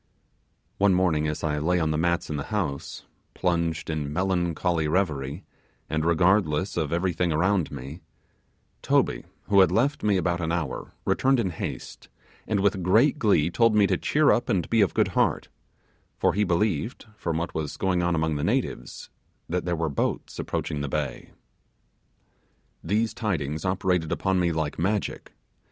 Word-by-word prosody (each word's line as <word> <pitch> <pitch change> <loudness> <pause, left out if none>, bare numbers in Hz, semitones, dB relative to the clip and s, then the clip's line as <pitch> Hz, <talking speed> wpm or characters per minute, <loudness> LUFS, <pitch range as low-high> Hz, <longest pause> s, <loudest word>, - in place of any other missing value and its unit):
One 100 -2 +4
morning 80 -5 +2
as 75 0 -4
I 75 -2 0
lay 90 +4 +1
on 80 -2 0
the - - 0
mats 85 -1 0
in - - -2
the 70 - -3
house, 80 -10 -3 0.3
plunged 85 -3 -1
in 75 -3 -3
melancholy 85 -2 0
reverie, 75 -2 -1 0.5
and 80 0 0
regardless 90 +1 +2
of 80 -4 -1
everything 85 0 0
around 90 +2 +1
me, 70 +5 -8 0.8
Toby, - - +1 0.2
who 100 -1 +3
had 95 - +6
left 140 +6 +1
me 105 -2 +2
about 85 -1 0
an 80 -1 -1
hour, 80 -6 -3
returned 135 -1 +2
in 95 -6 0
haste, 80 - -7 0.4
and 105 -3 +1
with 95 -1 +1
great 115 - +3
glee 90 - +3
told 115 +2 +3
me 105 -1 +5
to - - +2
cheer 150 0 +3
up 120 - +1
and 90 -4 +1
be 115 -1 +4
of 100 - +2
good - - +2
heart; - - 0 0.7
for - - +2
he 105 - +1
believed, 95 +1 -1
from 85 -6 -2
what 85 +1 -3
was 75 -2 -4
going 95 -2 +1
on 85 0 +1
among 80 -1 0
the 75 - -3
natives, 120 +8 -2 0.4
that 90 +1 -2
there 90 -1 0
were 80 0 -1
boats 70 - -2
approaching 75 - -3
the 70 - -3
bay. - - -3 1.5
These 110 +5 0
tidings 80 -9 -2
operated 90 -3 0
upon 95 -1 +1
me 85 -1 +2
like 80 -2 -2
magic. 100 +4 -2
85 Hz, 165 wpm, -26 LUFS, 80-100 Hz, 1.5 s, had